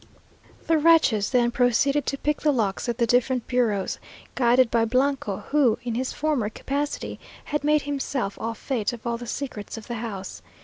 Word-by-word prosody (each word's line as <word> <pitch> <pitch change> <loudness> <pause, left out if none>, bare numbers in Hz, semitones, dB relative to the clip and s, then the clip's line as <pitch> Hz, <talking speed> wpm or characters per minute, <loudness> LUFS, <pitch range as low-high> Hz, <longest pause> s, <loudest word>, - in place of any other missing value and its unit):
The 325 -1 +3
wretches 300 -10 +4
then 240 -2 +2
proceeded 255 +4 +2
to 275 - -1
pick 300 +2 -1
the 300 - +3
locks 220 -5 -1
of 235 -1 -1
the 235 - +2
different 245 +1 +1
bureaux, 225 -6 +1 0.5
guided 245 -1 +3
by 230 -1 +3
Blanco, 255 -3 0
who, 275 -7 +4
in 240 -1 -3
his 255 +3 -2
former 290 -8 0
capacity, 285 +6 -3 0.2
had 295 -1 -2
made 300 0 +3
himself 270 -7 -2
au 230 0 -2
fait 235 -2 -2
of 235 -1 -10
all 235 0 -1
the 240 - -8
secrets 235 -5 -5
of 220 - -9
the 240 - -5
house. 200 -5 -6
245 Hz, 180 wpm, -25 LUFS, 230-280 Hz, 0.5 s, wretches